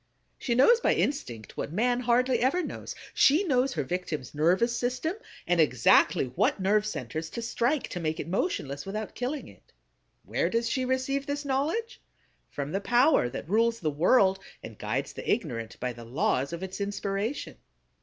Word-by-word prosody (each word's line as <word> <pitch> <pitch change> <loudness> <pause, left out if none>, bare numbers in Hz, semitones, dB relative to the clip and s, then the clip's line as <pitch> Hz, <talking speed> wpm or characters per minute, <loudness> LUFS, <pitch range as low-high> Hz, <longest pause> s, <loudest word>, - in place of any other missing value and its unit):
She 235 - -1
knows 460 - +6
by - - +2
instinct 120 - -3
what - - -3
man 240 +7 +1
hardly 250 +1 +2
ever 280 +9 +2
knows; - - -6 0.2
she 305 +8 +5
knows 265 -6 +1
her 150 - -1
victim's 155 -3 -4
nervous 185 +11 +2
system 250 +8 -1 0.3
and 175 -2 +3
exactly 130 -2 +4
what - - +1
nerve 210 +2 +2
centers 160 - -4
to 235 - -5
strike 245 +5 0
to 180 - -5
make 160 -1 -2
it - - -4
motionless 145 - -2
without 210 +2 -5
killing 265 +4 -4
it. - - -19 0.5
Where - - 0
does 230 0 0
she 255 +2 0
receive 260 +2 -1
this 285 +1 -3
knowledge? 305 - -1 0.5
From 145 +1 -5
the 195 - -1
power 245 - +4
that 120 - -7
rules 230 +4 +2
the 155 -3 -1
world, 190 - +4 0.2
and 110 - -8
guides 115 +7 -3
the - - -3
ignorant 125 - -2
by 125 -1 -2
the 120 0 -11
laws 130 +3 0
of 170 +2 -5
its 190 +2 -6
inspiration. 200 +4 -3
210 Hz, 175 wpm, -28 LUFS, 155-255 Hz, 0.5 s, knows